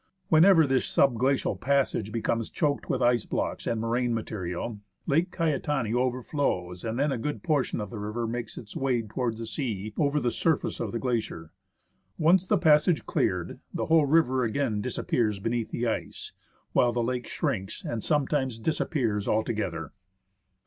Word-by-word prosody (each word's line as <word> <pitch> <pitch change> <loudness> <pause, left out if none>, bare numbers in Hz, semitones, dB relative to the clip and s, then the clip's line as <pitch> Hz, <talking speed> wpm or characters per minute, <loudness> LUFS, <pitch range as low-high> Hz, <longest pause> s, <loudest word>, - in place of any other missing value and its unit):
When 160 0 +6
ever 180 -5 +7
this 130 -2 +1
sub 135 -3 +3
glacial 135 +2 +1
passage 130 -6 0
becomes 115 0 -1
choked 150 -5 -1
with - - +1
ice 120 -2 +2
blocks - - -2
and 115 - 0
moraine 120 +1 0
material, 105 0 -4 0.3
Lake 165 +6 +2
Caetani 150 - -1
overflows, 125 - -1
and 115 +1 -3
then 145 +2 +1
a 130 - -2
good 145 +6 -3
portion 150 -9 0
of 105 -2 -5
the 110 - -6
river 105 +3 -3
makes 115 0 -4
its 105 -3 -9
way 130 -3 0
towards 115 +1 -2
the 115 - -4
sea 110 -4 -4
over 145 0 +2
the 120 -3 0
surface 160 +3 0
of 110 -4 -2
the 115 - -2
glacier. 115 -10 -3 0.7
Once 175 +3 +4
the 210 - +3
passage 155 0 +4
cleared, 90 -2 -1 0.2
the - - -1
whole 160 -3 +4
river 135 -4 +3
again 115 -2 0
disappears 115 -2 0
beneath 115 +3 -2
the 120 - -2
ice; 115 - -3 0.4
while 120 - +4
the 120 0 0
lake 125 0 -2
shrinks 95 +1 -3
and 115 -2 -3
sometimes 140 -4 0
disappears 115 -5 -1
altogether. 100 -8 -1
120 Hz, 165 wpm, -27 LUFS, 110-145 Hz, 0.7 s, ever